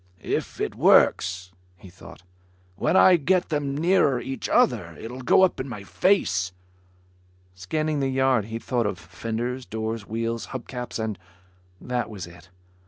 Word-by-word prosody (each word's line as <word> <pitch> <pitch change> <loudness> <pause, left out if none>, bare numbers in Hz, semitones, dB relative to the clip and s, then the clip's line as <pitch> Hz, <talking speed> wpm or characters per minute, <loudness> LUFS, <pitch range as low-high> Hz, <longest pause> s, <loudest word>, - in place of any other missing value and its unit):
"If - - -3
it - - -2
works," 90 0 +3 0.3
he 90 0 -14
thought, 90 - -14 0.5
"when 185 - +1
I 185 -1 +7
get 180 +4 +1
them 145 -3 -1
nearer 160 -6 +3
each 130 0 -5
other, - - +2
it'll 125 +3 -7
go 130 - +4
up 185 - +2
in 130 - -4
my 105 -5 -7
face." 100 - +1 1.0
Scanning 150 - -2
the 135 -1 0
yard 130 -4 +2
he 115 +1 -5
thought 120 -1 -1
of 100 -3 -3
fenders, 115 +9 -4
doors, 110 -1 -4
wheels, 115 +1 -3
hub 120 - -14
caps 125 -2 -5
and... 110 -4 -3 0.6
that 125 -2 -3
was 100 -5 -7
it. 85 +2 -15
115 Hz, 155 wpm, -25 LUFS, 100-135 Hz, 1.0 s, I